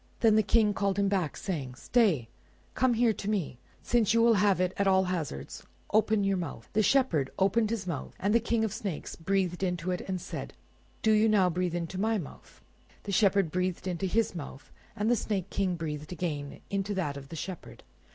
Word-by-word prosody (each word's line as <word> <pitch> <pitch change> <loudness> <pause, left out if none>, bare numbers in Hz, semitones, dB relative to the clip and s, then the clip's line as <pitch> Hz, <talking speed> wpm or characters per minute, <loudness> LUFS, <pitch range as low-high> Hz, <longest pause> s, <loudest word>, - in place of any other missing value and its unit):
Then 225 -3 +5
the 215 - +6
King 210 0 +3
called 195 0 0
him 200 -1 +2
back, 185 -6 -1
saying— 150 -11 -4
"Stay! 180 - +2 0.5
come 255 -2 +2
here 230 -1 +3
to 205 - -5
me, 180 - -2 0.2
since 230 -2 +2
you 230 - +5
will 235 0 +6
have 200 -3 +3
it 185 0 +1
at 200 - +1
all 190 0 +4
hazards. 165 - -4 0.3
Open 215 -1 +3
your 195 -1 +1
mouth." 175 - -6
The 215 - +3
Shepherd 210 - +2
opened 210 +3 +2
his 225 -5 -2
mouth, 165 -7 -5
and 200 +2 +1
the 235 - +5
King 230 0 0
of 220 - 0
the - - -5
snakes 190 -7 -5
breathed 180 +1 -1
into 180 -1 -1
it, 180 - -2
and 185 -1 -2
said— - - -7 0.5
"Do 220 - +4
you 215 +1 +4
now 190 -4 +4
breathe 175 0 -1
into 175 +2 -3
my 220 +1 +2
mouth." 160 -9 -10 0.4
The 200 - -4
Shepherd 195 -4 +3
breathed 180 +1 -1
into 185 +1 -2
his 225 +4 +1
mouth, 145 -5 -8 0.2
and 210 -1 -1
the 240 - +4
Snake 200 -3 -2
King 190 -3 0
breathed 150 -2 -5
again 150 -5 -4
into 200 +1 -1
that 150 -7 -1
of 140 -1 -9
the 165 - -7
Shepherd. 180 +2 -7
190 Hz, 210 wpm, -29 LUFS, 175-215 Hz, 0.5 s, the